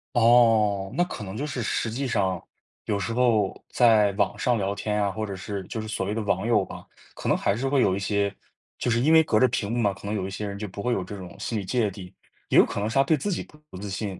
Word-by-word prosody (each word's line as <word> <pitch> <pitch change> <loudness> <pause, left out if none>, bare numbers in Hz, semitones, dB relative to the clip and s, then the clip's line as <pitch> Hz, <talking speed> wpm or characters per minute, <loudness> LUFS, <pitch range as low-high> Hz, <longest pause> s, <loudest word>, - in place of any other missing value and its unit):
哦， 115 -4 +4
那 175 - +3
可 180 -11 -6
能 95 +1 -7
就 145 - -2
是 130 -4 -4
实 115 0 -1
际 135 +4 -2
上， 95 -6 0 0.4
有 105 - 0
时 100 +4 -3
候 115 -5 +2
在 110 -4 +4
网 100 - 0
上 125 -2 +1
聊 100 -1 -1
天 105 +1 -2
啊， 100 - 0
或 110 +3 -4
者 100 -2 -5
是， 95 +1 -5
就 110 - -5
是 110 - -5
所 105 -3 -3
谓 105 - -2
的 115 - -1
网 100 +1 0
友 110 -5 +3
吧， - - -10 0.3
可 - - -4
能 - - +3
还 100 - +1
是 130 +5 -2
会 135 -1 +3
有 95 -5 +3
一 - - -3
些 100 0 0 0.5
就 - - -1
是 115 0 +2
因 150 +6 +3
为 160 0 +7
隔 110 -9 +2
着 130 - +5
屏 115 -4 -2
幕 120 - -1
嘛， 105 -4 +2
可 100 - -10
能 105 - -2
有 95 -3 -2
一 - - -4
些 105 +2 -4
人 100 0 -5
就 105 +1 -5
不 100 +1 -7
会 125 +3 0
有 95 - -1
这 100 +3 -8
种 90 -3 -9
心 110 - -2
理 - - -4
芥 105 +2 0
蒂。 90 -2 -10 0.4
也 - - +3
有 - - +8
可 - - -4
能 105 +2 -1
是 - - -6
他 135 - +5
对 155 +3 +3
自 155 +8 -3
己 175 - -2
不 150 - -19
不 - - -10
自 100 +2 -6
信， 95 -1 -4
105 Hz, 315 characters per minute, -25 LUFS, 100-120 Hz, 0.5 s, 有